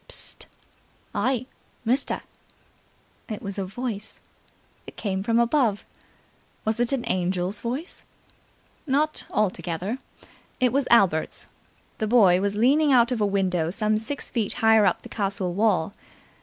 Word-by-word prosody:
"Psst! - - -3 0.7
Hey, 255 -1 0 0.4
mister!" 255 +5 +1 1.1
It 215 - -5
was 200 0 -4
a 195 - -1
voice. 215 +1 -5 0.7
It - - -10
came 190 -3 -2
from 230 +3 +1
above. 235 -3 +2 0.8
Was 220 +1 +1
it 240 +1 +1
an 265 -3 -1
angel's 185 +2 -1
voice? 260 +9 -3 0.9
Not 300 +3 +1
altogether. 195 +2 -1 0.6
It 250 -1 +2
was 275 -1 +1
Albert's. 190 -9 +3 0.5
The 215 - 0
boy 195 -6 +5
was 200 0 0
leaning 280 +7 +4
out 240 -1 +5
of 240 -3 -1
a 205 - +3
window 185 -5 0
some 215 +3 +1
six 225 +7 -3
feet 225 -5 -1
higher 225 -3 +5
up 180 - 0
the - - -9
castle 195 -3 -2
wall. 205 -3 +1
215 Hz, 135 wpm, -25 LUFS, 195-245 Hz, 1.1 s, boy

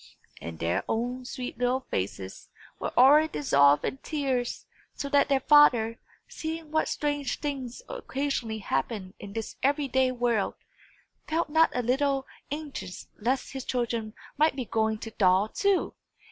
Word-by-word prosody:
And 85 0 -6
their 85 +2 0
own 245 +3 -2
sweet 250 0 -6
little 250 +1 +1
faces 95 0 -4 0.3
were - - -3
already 290 +5 +7
dissolved 140 - +4
in - - -2
tears; 265 -4 -2 0.3
so 280 - -4
that 285 0 +3
their 270 -1 +3
father, 245 -7 +5 0.3
seeing 320 -1 -6
what 315 0 +1
strange 290 -3 -2
things 275 - -4
occasionally 265 -5 -3
happen 190 - -2
in 200 - -9
this 225 0 -5
every 285 +1 +2
day 260 0 +2
world, 240 -4 0 0.7
felt 320 0 0
not 320 +1 +5
a 250 - 0
little 270 +2 +1 0.2
anxious 285 -11 -6
lest 250 +6 -1
his 265 -1 -5
children 235 -4 -2 0.2
might 310 -1 +4
be 260 -3 -3
going 220 0 0
to 225 +1 -8
thaw 190 -1 +4
too! 395 - 0
250 Hz, 145 wpm, -28 LUFS, 220-285 Hz, 0.7 s, already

